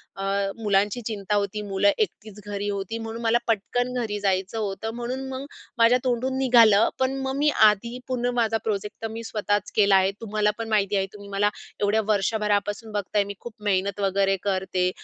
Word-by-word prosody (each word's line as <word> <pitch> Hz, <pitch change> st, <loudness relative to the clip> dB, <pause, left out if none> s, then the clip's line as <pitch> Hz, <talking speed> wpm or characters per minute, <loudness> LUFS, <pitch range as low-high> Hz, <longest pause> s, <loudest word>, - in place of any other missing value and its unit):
अ, 195 Hz, -, -5 dB, 0.4 s
मुलांची 205 Hz, +2 st, +1 dB
चिंता 210 Hz, -2 st, -2 dB
होती. 205 Hz, +1 st, -1 dB
मुलं 200 Hz, 0 st, +2 dB
एकटीच 215 Hz, -, -3 dB
घरी 205 Hz, 0 st, -3 dB
होती, 200 Hz, +2 st, -3 dB
म्हणून 225 Hz, +1 st, -6 dB
मला 230 Hz, +1 st, +3 dB
पटकन 245 Hz, +3 st, 0 dB
घरी 210 Hz, -3 st, -3 dB
जायचं 195 Hz, +1 st, 0 dB
होतं 215 Hz, +1 st, -3 dB
म्हणून 255 Hz, +3 st, -4 dB
मग 265 Hz, +1 st, -5 dB, 0.3 s
माझ्या 235 Hz, +2 st, +5 dB
तोंडून 255 Hz, +1 st, 0 dB
निघालं. 230 Hz, -5 st, +6 dB
पण 260 Hz, +1 st, +1 dB
मग 265 Hz, 0 st, -2 dB
मी 300 Hz, +1 st, +3 dB, 0.2 s
आधी 235 Hz, +4 st, -3 dB
पूर्ण 245 Hz, -1 st, -1 dB
माझा 225 Hz, -1 st, +2 dB
प्रोजेक्ट 210 Hz, -1 st, -3 dB
तर 225 Hz, -, -2 dB
मी 230 Hz, +1 st, -6 dB
स्वतःच 210 Hz, -2 st, -1 dB
केला 200 Hz, -2 st, +5 dB
आहे. 190 Hz, +1 st, +4 dB
तुम्हालापण 215 Hz, +1 st, -1 dB
माहिती 205 Hz, -2 st, +1 dB
आहे 195 Hz, -, +2 dB
तुम्ही 200 Hz, -1 st, -11 dB
मला 200 Hz, +1 st, +2 dB, 0.3 s
एवढ्या 205 Hz, +2 st, +2 dB
वर्षभरापासून 210 Hz, +1 st, 0 dB
बघताय 205 Hz, 0 st, 0 dB
मी 200 Hz, 0 st, -6 dB
खूप 240 Hz, -, -9 dB
मेहनत 200 Hz, 0 st, 0 dB
वगैरे 195 Hz, 0 st, +2 dB
करते. 185 Hz, -2 st, 0 dB
210 Hz, 175 wpm, -25 LUFS, 200-230 Hz, 0.4 s, निघालं